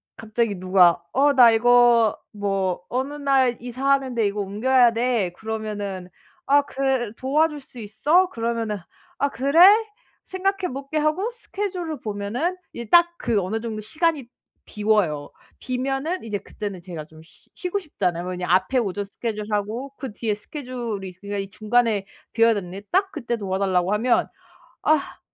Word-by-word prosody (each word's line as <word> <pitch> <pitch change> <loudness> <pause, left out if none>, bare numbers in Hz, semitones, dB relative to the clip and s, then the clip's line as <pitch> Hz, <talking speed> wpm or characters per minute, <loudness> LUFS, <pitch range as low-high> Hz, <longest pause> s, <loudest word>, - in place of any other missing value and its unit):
갑자기 220 -1 -1
누가 180 -2 +4
"어 285 +2 +3
나 245 -4 +8
이거 240 -1 +5
뭐 195 -3 -1
어느 265 +4 -2
날 270 -4 +2
이사하는데 255 -1 0
이거 205 +1 -1
옮겨야 240 +5 +3
돼." 230 -6 0
그러면은 205 -4 -5 0.4
"아 285 +1 +5
그래, 265 -5 -1
도와줄 300 +3 +1
수 255 -2 -13
있어?" 295 - +2
그러면은 230 - -2 0.4
"아 280 - +2
그래? 280 +5 +2 0.6
생각해 380 -4 -2
볼게." 275 +3 -4
하고 310 +10 0
스케줄을 370 - -5
보면은 225 - -2 0.2
이게 235 -2 -7
딱 345 0 +6
그 210 -4 0
어느 215 +5 -3
정도 225 -2 -4
시간이 300 +3 -1 0.4
비어요. 205 -9 0 0.3
비면은 270 +7 -2
이제 210 -2 -2
그때는 200 -2 -7
제가 165 -4 -7
좀 155 0 -16
쉬 160 - -23
쉬고 365 +2 -2
싶잖아요. 180 - -2
왜냐면 180 0 -1
앞에 190 +8 +1
오전 205 -2 -2
스케줄 210 +1 -5
하고 220 +7 -2
그 265 -4 -6
뒤에 215 -2 -2
스케줄이 235 -5 -6
있으니까 200 +3 -7
이 195 0 -4
중간에 215 -1 +1 0.3
비어져 230 -2 +4
있는데 190 +3 -9
딱 385 +1 +2
그때 235 -1 -3
도와달라고 190 -1 0
하면 235 +3 +2 0.6
"아 310 -2 +1
230 Hz, 315 characters per minute, -23 LUFS, 205-275 Hz, 0.6 s, 나